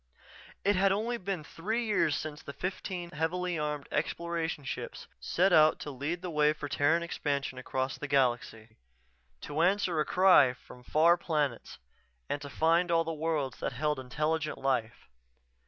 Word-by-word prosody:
It 205 +1 +4
had 195 +1 +4
been - - +3
only 200 -6 -3
three 220 +10 -3
years 205 -9 +2
since 150 -1 -6
the 140 - -8
fifteen 180 -1 -5
heavily 175 +2 -1
armed 150 -1 -3
Exploration 170 -3 -2
ships - - -6
set 185 +2 +2
out 155 0 +6
to 145 - -5
lead 150 +7 -4
the 180 - -4
way 150 -1 +3
for 150 -1 -6
Terran 150 +4 +2
expansion 140 -5 -2
across 130 +1 -3
the 150 - -4
galaxy; 120 -5 0 0.6
to 150 +2 -2
answer 180 -2 +2
a 150 - +2
cry 180 -9 +5
from 125 0 -15
far 165 +6 +4
planets, 150 -8 -2 0.5
and 145 - -3
to 140 - -7
find 165 +4 +2
all 165 -1 +3
the 165 0 -3
worlds 155 -5 -2
that - - -3
held 150 -2 -1
intelligent 155 +4 -2
life. 125 -4 -2
155 Hz, 160 wpm, -30 LUFS, 140-175 Hz, 0.6 s, out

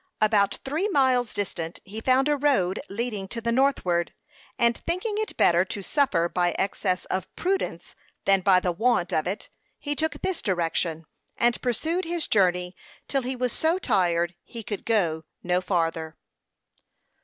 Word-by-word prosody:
About 205 -2 +3
three 310 +9 0
miles 260 - +3
distant, 170 -4 -3
he 215 +3 -7
found 260 +3 +3
a 295 - +3
road 265 -11 +1
leading 210 -2 -3
to 230 - -4
the 235 +1 -1
northward; 230 -10 +1 0.4
and 235 0 +4
thinking 365 +6 -2
it 435 - -3
better 175 +1 +5
to 195 +1 -5
suffer 185 - +2
by 175 0 0
excess 190 -1 -1
of 185 -2 -2
prudence 385 +2 -2 0.3
than 195 -1 +4
by 185 -1 +5
the 180 -1 0
want 190 -1 +1
of 155 +2 +1
it, 195 +4 -4 0.3
he 290 0 -3
took 315 +2 0
this 375 -3 -1
direction, 165 -3 -1 0.3
and 240 0 +2
pursued 320 - -1
his 340 0 -1
journey 180 -3 +2 0.3
till 275 - 0
he 260 +1 -3
was 250 -1 -1
so 320 +3 +1
tired 175 - +1
he 230 -2 -8
could 205 -1 -5
go 170 -8 +1 0.2
no 180 +1 +1
farther. 165 -3 -1
205 Hz, 160 wpm, -26 LUFS, 180-265 Hz, 0.4 s, better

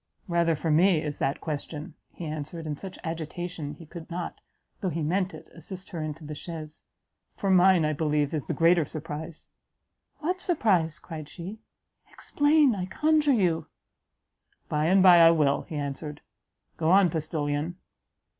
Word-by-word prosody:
"Rather 170 -2 +2
for 160 +1 -1
me 170 +2 +5
is 150 -1 -4
that 135 - 0
question," 155 +1 -5 0.2
he 175 - -8
answered, 155 +2 -5
in 150 -1 -3
such 185 +5 -9
agitation 165 -1 -5
he 165 - -12
could 165 +1 -10
not, 175 0 -5 0.4
though 190 - -1
he 165 -1 -2
meant 185 +4 0
it, 160 0 -11
assist 185 +3 -7
her 170 -4 -4
into 155 +1 -5
the 150 - -6
chaise, 155 0 -8 0.5
"for 195 - 0
mine, 185 -2 +5
I 155 - +1
believe, 150 -1 0
is 150 -3 -3
the - - -1
greater 170 0 +4
surprise!" 155 +2 -7 0.7
"What 365 +4 -2
surprise?" 190 - +2
cried 155 -3 -8
she, 185 +7 -8 0.5
"explain, 290 -2 +3
I 185 -3 -3
conjure 305 +6 +2
you!" 180 -8 +1 1.0
"By 150 +1 +1
and 185 +3 +5
bye 180 -2 +9
I 165 0 +9
will," 150 -4 +3
he 160 - -5
answered; 145 +1 -4 0.6
"go 160 -1 +1
on 185 -2 +5
postilion." 155 0 -2
165 Hz, 160 wpm, -27 LUFS, 155-185 Hz, 1.0 s, bye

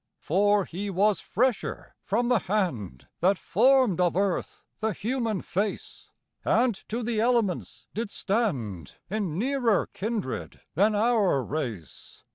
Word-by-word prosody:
For 205 +3 +2
he 200 +4 -5
was 200 +2 +2
fresher 245 +1 -1
from 235 +4 0
the 245 -2 +3
hand 165 - -2
That 190 +3 +3
formed 245 -4 +3
of 175 -2 +2
earth 195 -1 -1
the 220 0 0
human 225 -2 -2
face, 200 +3 -3 0.3
And 240 +1 +3 0.2
to 235 +3 -2
the 225 -1 0
elements 230 -6 0
did 225 0 -3
stand 135 - -2 0.2
In 195 -7 -2
nearer 245 -2 +2
kindred, 190 - -4
than 205 +7 +3
our 210 - +3
race. 120 - -6
205 Hz, 125 wpm, -27 LUFS, 175-230 Hz, 0.3 s, the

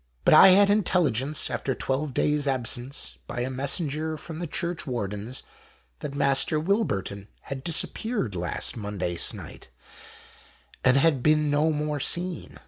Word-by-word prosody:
But - - +6
I 155 - +9
had 200 +2 +6
intelligence, 155 - +1
after 135 - -2
12 140 +2 -2
days' 150 +2 0
absence, 130 +1 -2
by 120 - -4
a 130 +2 -2
messenger 150 +3 -2
from 160 +1 -8
the 175 - -4
Churchwardens, 125 - -3 0.6
that 140 - -6
Master 140 +2 +3
Wilburton 130 - -1
had 135 -1 -7
disappeared 175 - -1
last 90 -2 -2
Monday 100 -5 -4
sennight, - - -4 1.1
and 130 +1 +4
had 140 -2 +3
been 150 +1 +3
no 150 +2 +2
more 150 -1 -2
seen. 175 +4 -1
145 Hz, 135 wpm, -26 LUFS, 125-160 Hz, 1.1 s, I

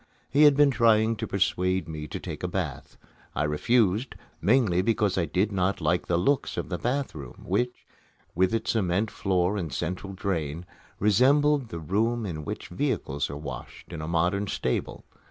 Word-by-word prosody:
He 150 +2 +6
had 145 -2 +6
been 145 -1 +6
trying 115 -2 +4
to 110 +1 -3
persuade 95 -2 0
me 75 -1 -6
to - - -5
take - - -7
a - - -1
bath. - - -4 0.4
I 75 - +1
refused, 105 - +1 0.3
mainly 110 -6 +3
because 105 -2 +1
I 90 - +1
did 95 +5 0
not 95 0 0
like 85 0 0
the 85 - +2
looks 135 +11 +1
of - - -3
the 90 -2 -3
bath 135 +6 -1
room, 70 -5 -10
which, 120 +7 -1 0.5
with 90 +2 +2
its 115 0 0
cement 100 0 0
floor 95 +1 0
and 85 -6 -3
central 90 +3 -4
drain, 85 -4 -3 0.3
resembled 135 +6 +3
the 85 - -5
room 110 +8 0
in 80 -5 -4
which - - -6
vehicles 70 +1 -1
are 70 - -5
washed 75 +3 -8
in 80 - -5
a 75 - -5
modern 90 +5 +1
stable. 65 - -2
95 Hz, 175 wpm, -27 LUFS, 85-115 Hz, 0.5 s, He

